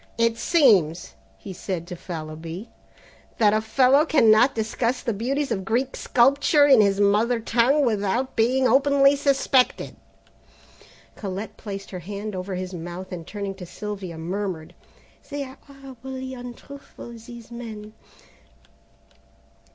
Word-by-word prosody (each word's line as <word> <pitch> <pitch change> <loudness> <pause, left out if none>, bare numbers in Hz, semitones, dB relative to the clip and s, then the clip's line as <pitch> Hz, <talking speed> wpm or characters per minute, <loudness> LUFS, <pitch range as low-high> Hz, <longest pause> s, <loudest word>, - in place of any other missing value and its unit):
"It 230 0 +2
seems," 205 - +3 0.2
he 195 - -9
said 180 -2 -4
to 180 - -7
Fallowby, 165 +3 -7 0.7
"that 210 -2 +4
a 215 - +2
fellow 255 +6 +4
cannot 245 -5 +4
discuss 230 +3 -1
the 235 -4 -1
beauties 270 +6 -2
of 195 -4 -1
Greek 245 +6 -1
sculpture 280 +4 +3
in 265 -6 +7
his 200 -1 +2
mother 215 +4 +3
tongue, 245 +6 +2
without 225 +3 -1
being 255 +3 +2
openly 275 +2 +4
suspected." 275 -2 +1 1.2
Colette 200 +1 -6
placed 195 -2 -8
her 185 - -5
hand 205 +3 -6
over 185 +1 -4
his 185 0 -5
mouth 175 +2 -7
and 170 -3 -7
turning 200 -2 -5
to 190 -2 -10
Sylvia, 195 -4 -6
murmured, 175 -1 -4 0.6
"They 285 0 -3
are 260 -1 -11
horridly 265 -1 -8
untruthful, 245 +1 -10
these 235 0 -12
men." 215 -3 -8
225 Hz, 130 wpm, -24 LUFS, 195-260 Hz, 1.2 s, in